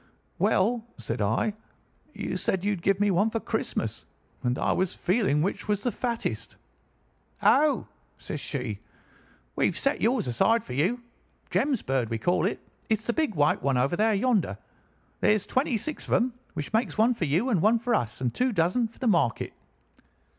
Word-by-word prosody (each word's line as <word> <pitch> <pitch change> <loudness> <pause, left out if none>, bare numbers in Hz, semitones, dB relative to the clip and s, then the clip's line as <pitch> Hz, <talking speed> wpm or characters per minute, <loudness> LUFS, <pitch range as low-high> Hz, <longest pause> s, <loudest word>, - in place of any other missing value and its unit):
"'Well,' 225 +5 +2
said 115 0 -4
I, 110 - +1 0.6
'you - - -3
said 190 0 -1
you'd 205 -4 0
give 195 +2 +2
me 205 -1 +3
one 200 +5 +3
for 225 - -2
Christmas, - - -3 0.3
and 125 +1 0
I - - +1
was 185 -1 0
feeling 180 -7 +1
which 195 - -2
was 205 -1 0
the 245 - +1
fattest.' 235 -1 -3 0.9
"'Oh,' 300 0 +4 0.3
says - - -5
she, - - -3 0.8
'we've - - +1
set 275 +2 0
yours 230 - +2
aside 200 - +2
for 125 - -7
you—Jem's 235 - -2
bird, 130 -4 0
we 115 - -1
call 175 +7 +1
it. - - -3 0.3
It's 220 -1 +1
the 235 - -1
big 310 - 0
white 150 -1 +2
one 135 -2 +1
over 175 - +2
yonder. 200 - +1 0.6
There's 210 -1 +3
twenty 260 -2 +1
six 310 +7 -4
of - - -1
them, 250 0 +1 0.2
which 150 - -5
makes 225 +1 0
one 225 +3 +4
for 185 - -2
you, 170 - +1
and 200 -9 +2
one 220 +5 +4
for 235 +1 -1
us, 120 - -1
and 125 -2 0
two 255 +1 +1
dozen 200 +5 +1
for 225 - -23
the 260 - -4
market. 170 - +1
205 Hz, 175 wpm, -27 LUFS, 160-235 Hz, 0.9 s, Oh